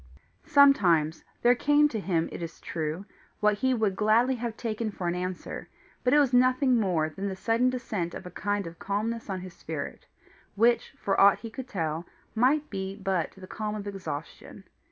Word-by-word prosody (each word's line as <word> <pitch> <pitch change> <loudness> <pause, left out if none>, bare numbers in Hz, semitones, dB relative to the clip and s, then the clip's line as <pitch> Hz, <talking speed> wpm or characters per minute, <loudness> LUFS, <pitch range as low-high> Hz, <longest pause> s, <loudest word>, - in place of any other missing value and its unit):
Sometimes 175 - +4 0.2
there 240 +1 +7
came 290 +4 +4
to 225 - -3
him, 170 -5 0
it - - -7
is 165 -1 -7
true, 160 +3 -4 0.3
what 210 -1 +2
he 260 +3 +2
would 220 -6 +1
gladly 225 +5 +3
have 235 -2 -4
taken 225 -1 -2
for 185 -4 -4
an 175 - +1
answer, 180 0 -5 0.3
but 250 - +2
it 295 - +6
was 280 -4 +3
nothing 255 +1 +4
more 175 -7 +1
than 195 +4 -4
the 190 - -3
sudden 230 +5 +2
descent 215 -9 -3
of - - -8
a 180 - -8
kind 205 +2 -2
of 165 0 -9
calmness 215 +3 -2
on 190 -2 -3
his 185 -1 -9
spirit, 155 -4 -6 0.5
which, 235 +2 +2
for 195 - +1
aught 200 0 +7
he 230 - -8
could 260 +1 -7
tell, 165 -5 -3 0.3
might 275 +6 +2
be 190 -1 -4
but 190 -4 -1
the 190 - -10
calm 215 +2 -4
of 205 -1 -6
exhaustion. 185 -6 -7
205 Hz, 190 wpm, -28 LUFS, 180-240 Hz, 0.5 s, there